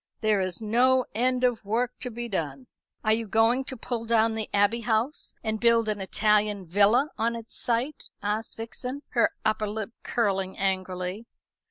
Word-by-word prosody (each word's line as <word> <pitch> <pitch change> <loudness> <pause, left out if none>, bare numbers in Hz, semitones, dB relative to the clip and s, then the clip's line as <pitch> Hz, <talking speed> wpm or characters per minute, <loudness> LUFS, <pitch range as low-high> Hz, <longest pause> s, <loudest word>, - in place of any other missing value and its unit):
There 215 -3 +2
is 185 +3 -2
no 250 +4 +3
end 250 +3 +1
of 245 -3 +2
work 235 +4 -1
to 250 - -3
be 240 +1 -5
done." 145 - -3 0.4
"Are 215 - +4
you 225 0 -1
going 225 +5 +3
to 260 - -4
pull 230 0 -3
down 225 -1 +3
the 220 -1 -3
Abbey 205 +3 +3
House 235 +4 -1
and 220 0 -1
build 230 -1 +4
an 210 -2 -1
Italian 210 0 +2
villa 205 - +3
on 230 +1 +1
its 230 -1 -8
site?" 245 +5 -1
asked 210 +2 -2
Vixen, 250 +5 -5
her 235 - +3 0.2
upper 215 -1 +1
lip 215 +1 -4
curling 195 -5 -1
angrily. 185 +2 -2
220 Hz, 170 wpm, -27 LUFS, 205-235 Hz, 0.4 s, Are